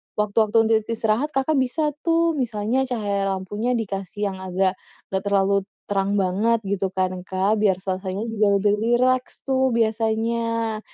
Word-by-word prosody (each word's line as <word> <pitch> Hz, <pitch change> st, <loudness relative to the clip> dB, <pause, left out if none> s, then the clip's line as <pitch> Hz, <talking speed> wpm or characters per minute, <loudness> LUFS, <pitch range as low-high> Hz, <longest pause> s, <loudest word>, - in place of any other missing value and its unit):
waktu-waktu 210 Hz, +1 st, +1 dB
untuk 225 Hz, 0 st, +3 dB
istirahat, 225 Hz, +5 st, -1 dB
Kakak 270 Hz, +1 st, +2 dB
bisa 300 Hz, +4 st, 0 dB
tuh, 335 Hz, 0 st, +2 dB
misalnya 245 Hz, 0 st, -1 dB
cahaya 200 Hz, -5 st, -1 dB
lampunya 205 Hz, +6 st, -2 dB
dikasih 200 Hz, -2 st, -3 dB
yang 190 Hz, -, -8 dB
agak 190 Hz, 0 st, 0 dB, 0.4 s
nggak 190 Hz, +1 st, -1 dB
terlalu 200 Hz, 0 st, +3 dB, 0.4 s
terang 200 Hz, 0 st, +1 dB
banget 205 Hz, +4 st, +1 dB
gitu 195 Hz, -1 st, -1 dB
kan, 185 Hz, -1 st, -2 dB
Kak, 195 Hz, +3 st, +1 dB
biar 200 Hz, -3 st, +3 dB
suasana 190 Hz, +2 st, -4 dB
juga 220 Hz, -2 st, +1 dB
lebih 205 Hz, +1 st, +2 dB
rileks 250 Hz, +3 st, +1 dB
tuh 265 Hz, -2 st, +1 dB
biasanya. 225 Hz, 0 st, 0 dB
215 Hz, 145 wpm, -23 LUFS, 195-235 Hz, 0.4 s, untuk